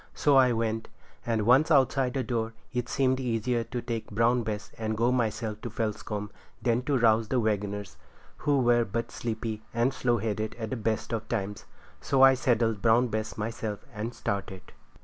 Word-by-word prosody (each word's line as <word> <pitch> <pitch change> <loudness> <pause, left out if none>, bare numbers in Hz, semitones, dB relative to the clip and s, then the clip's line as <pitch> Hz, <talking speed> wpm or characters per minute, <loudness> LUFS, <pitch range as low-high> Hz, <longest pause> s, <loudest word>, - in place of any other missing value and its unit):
So 145 -2 +3
I 130 -2 +6
went, 115 -1 -1 0.4
and 110 -3 +1
once 130 +7 +5
outside 135 -3 +3
the 135 - 0
door 115 -1 -2 0.2
it 125 0 -2
seemed 130 -1 +1
easier 120 -1 0
to 120 +1 -5
take 115 -2 -4
Brown 115 +3 +2
Bess 110 -1 -4
and 110 -1 -2
go 120 +2 +3
myself 110 -3 -1
to 120 - -5
Felscombe 105 -2 -3 0.3
than 120 -1 +1
to 140 -1 +2
rouse 115 -2 +3
the 125 - +1
waggoners, 105 -2 -2 0.4
who 145 -2 +2
were 120 -1 +4
but 115 +2 -3
sleepy 110 -2 -4
and 120 +3 +2
slow 120 -3 +1
headed 110 0 -2
at 110 -2 -5
the - - 0
best 110 0 -2
of 110 -1 -3
times. 105 -3 -3 0.4
So 135 -1 +3
I 135 0 +9
saddled 115 -4 +1
Brown 120 +2 +4
Bess 110 +1 -3
myself 110 -1 -4
and 110 +3 -4
started. 95 -2 -4
115 Hz, 180 wpm, -28 LUFS, 110-125 Hz, 0.4 s, I